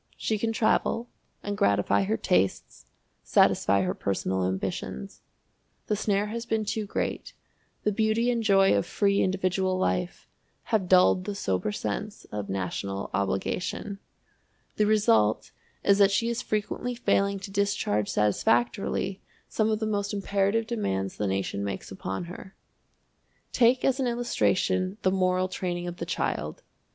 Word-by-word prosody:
She 215 -1 -1
can 225 +1 0
travel, 230 +1 +1 0.3
and 205 0 -3
gratify 100 - +2
her 110 +3 0
tastes, 95 -1 0 0.3
satisfy 100 0 +3
her 90 0 -1
personal 95 -1 -1
ambitions. 65 -8 -4 0.6
The 210 - 0
snare 205 -1 0
has 230 +2 -4
been 220 -1 0
too 210 0 -2
great; - - -3 0.5
the 210 - +2
beauty 220 +3 +1
and 235 -1 0
joy 195 -3 +4
of 100 - 0
free 200 -1 +2
individual 185 0 0
life 180 -1 -1 0.5
have 190 -5 +2
dulled 185 0 +5
the 205 - -3
sober 95 - -1
sense 110 - -4
of 105 -1 -4
national 95 +1 -3
obligation. 180 - -2 0.8
The 210 - +3
result 110 - +3 0.3
is 200 0 +4
that 200 -1 +7
she 230 +4 +1
is 235 - -2
frequently 215 +3 -2
failing 200 -4 +1
to 195 0 -8
discharge 195 - 0
satisfactorily 120 - +1 0.3
some 220 0 +1
of 215 - +1
the 220 - -2
most 205 -1 -1
imperative 200 +2 +1
demands 95 - -2
the 105 - -1
nation 95 +1 -2
makes 100 -1 -5
upon 95 - -4
her. 180 +2 -10 1.0
Take 250 +1 +3
as 265 0 +2
an 260 - +1
illustration 190 -5 0
the 185 - +3
moral 185 -1 +1
training 175 -2 -3
of 175 0 -5
the - - -5
child. - - -2
190 Hz, 145 wpm, -27 LUFS, -, 1.0 s, that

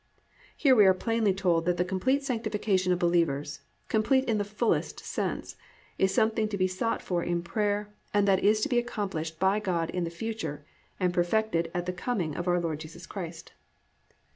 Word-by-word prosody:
"+ - - -28
Here 270 -3 +5
we 210 -4 +7
are 190 - +6
plainly 225 +1 +1
told 180 -4 +1
that 180 0 +1
_the 180 +1 0
complete 260 +10 +1
sanctification 210 -7 0
of 180 - +3
believers, 155 -5 0 0.3
complete 260 +5 +2
in 225 -4 +1
the - - +1
fullest 210 +3 -1
sense, - - -3 0.4
is 190 0 +3
something 220 +1 +2
to 210 -1 -3
be 185 -1 +2
sought 185 +5 -2
for 175 -2 -1
in 170 0 -1
prayer 205 +3 -1 0.2
and 205 -1 +2
that 195 -1 +3
is 215 +2 +4
to - - +1
be 245 - +3
accomplished 190 -9 -4
by 190 +3 +3
God 175 -5 -1
in 180 - -1
the 170 - -2
future 170 -6 -5 0.3
and 180 -1 +1
perfected 175 -1 +1
at 175 0 -1
the 180 - -2
coming 180 -5 -2
of 175 - -4
our 175 0 +3
Lord 160 -3 -2
Jesus 155 +1 -10
Christ_. 170 -4 -7
190 Hz, 190 wpm, -28 LUFS, 175-215 Hz, 0.4 s, we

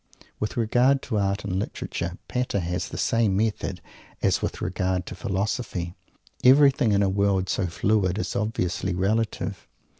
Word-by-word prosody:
With 105 - -3
regard 125 +4 +3
to 110 -5 -1
Art 100 0 0
and 95 -2 -1
Literature, 85 -3 -4
Pater 125 -5 -1
has 90 +1 -2
the - - -6
same 110 -5 +2
method 110 0 -1 0.4
as - - +2
with - - -3
regard 90 0 -1
to - - -7
Philosophy. 95 -1 -2 0.5
Everything 135 -2 +6
in 100 0 +3
a - - +3
world 95 -1 +1
so 95 - 0
fluid 95 +2 +1
is 90 -4 -3
obviously 95 -4 -1
relative. 105 +4 -1
100 Hz, 150 wpm, -25 LUFS, 90-110 Hz, 0.5 s, Everything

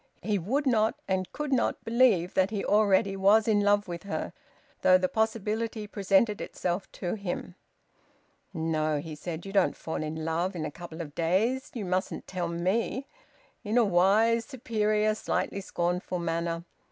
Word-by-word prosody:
He 205 +1 0
would 265 - -1
not 225 -2 +2
and 190 -1 -1
could 295 -2 -3
not 255 - 0
believe 225 -7 +3
that 190 0 +3
he 210 -2 -3
already 200 -2 +3
was 205 +3 +4
in 210 -2 +3
love 205 0 +3
with 170 -1 -5
her, 200 - -4 0.5
though 185 - +6
the 185 0 +1
possibility 220 +1 -1
presented 205 +1 +2
itself 180 +2 -3
to 175 - -3
him. 190 -3 -4 1.0
"No," 160 -3 0
he 155 +2 -6
said, 160 +3 -6
"you 195 - -7
don't 195 -2 +3
fall 160 - -4
in 155 +1 -4
love 170 +4 -1
in 160 - -3
a - - -4
couple 170 0 -8
of 145 -3 -8
days. 200 - +1
You 220 -5 -3
mustn't 185 +1 -2
tell 180 -2 -3
me 190 +10 -1 0.3
" - - -34
in 220 +2 0
a 240 - +5
wise, 210 +5 +4
superior, 215 -4 0
slightly 200 -2 -2
scornful 180 0 -2
manner. 170 0 -2
195 Hz, 165 wpm, -28 LUFS, 175-220 Hz, 1.0 s, though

